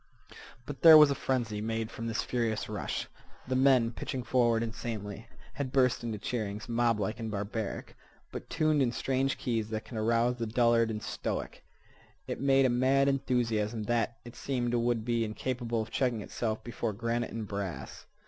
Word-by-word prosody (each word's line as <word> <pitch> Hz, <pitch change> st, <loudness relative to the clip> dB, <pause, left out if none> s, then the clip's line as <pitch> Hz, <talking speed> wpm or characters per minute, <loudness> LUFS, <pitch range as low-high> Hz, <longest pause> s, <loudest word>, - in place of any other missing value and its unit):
But 145 Hz, +1 st, -7 dB
there 160 Hz, -2 st, +11 dB
was 150 Hz, -2 st, +8 dB
a -, -, +3 dB
frenzy 120 Hz, -6 st, -2 dB
made 110 Hz, 0 st, -2 dB
from 115 Hz, -, -5 dB
this 115 Hz, 0 st, -1 dB
furious 115 Hz, -3 st, -1 dB
rush. 105 Hz, -2 st, -3 dB, 0.4 s
The 130 Hz, -, -1 dB
men, 130 Hz, -3 st, +4 dB
pitching 125 Hz, +2 st, -4 dB
forward 120 Hz, -2 st, +2 dB
insanely, 110 Hz, -2 st, -5 dB, 0.3 s
had 140 Hz, -3 st, -4 dB
burst 130 Hz, -3 st, +2 dB
into 115 Hz, -2 st, -3 dB
cheerings, 105 Hz, -1 st, -4 dB
moblike 115 Hz, -3 st, 0 dB
and 115 Hz, -1 st, -4 dB
barbaric, 105 Hz, +1 st, -4 dB, 0.4 s
but -, -, -7 dB
tuned 155 Hz, -2 st, +2 dB
in 125 Hz, -3 st, +2 dB
strange 135 Hz, +2 st, 0 dB
keys 115 Hz, -4 st, -2 dB
that 110 Hz, -1 st, -4 dB
can 110 Hz, +1 st, -8 dB
arouse 115 Hz, +3 st, +2 dB
the 115 Hz, -1 st, -2 dB
dullard 115 Hz, 0 st, +3 dB
and 105 Hz, -1 st, -4 dB
the -, -, -8 dB
stoic. -, -, -4 dB, 0.6 s
It -, -, -5 dB
made 135 Hz, -1 st, +4 dB
a -, -, +4 dB
mad 130 Hz, +3 st, +3 dB
enthusiasm 120 Hz, -5 st, 0 dB
that, 115 Hz, +1 st, 0 dB
it 120 Hz, -, -10 dB
seemed, 120 Hz, -3 st, -2 dB
would 120 Hz, -2 st, +1 dB
be 120 Hz, -1 st, +1 dB
incapable 115 Hz, +1 st, -2 dB
of 110 Hz, -, -12 dB
checking 125 Hz, -4 st, 0 dB
itself 110 Hz, 0 st, -3 dB
before 115 Hz, -1 st, -3 dB
granite 115 Hz, +2 st, -2 dB
and 110 Hz, -2 st, -5 dB
brass. 100 Hz, -8 st, -6 dB
115 Hz, 175 wpm, -30 LUFS, 110-125 Hz, 0.6 s, there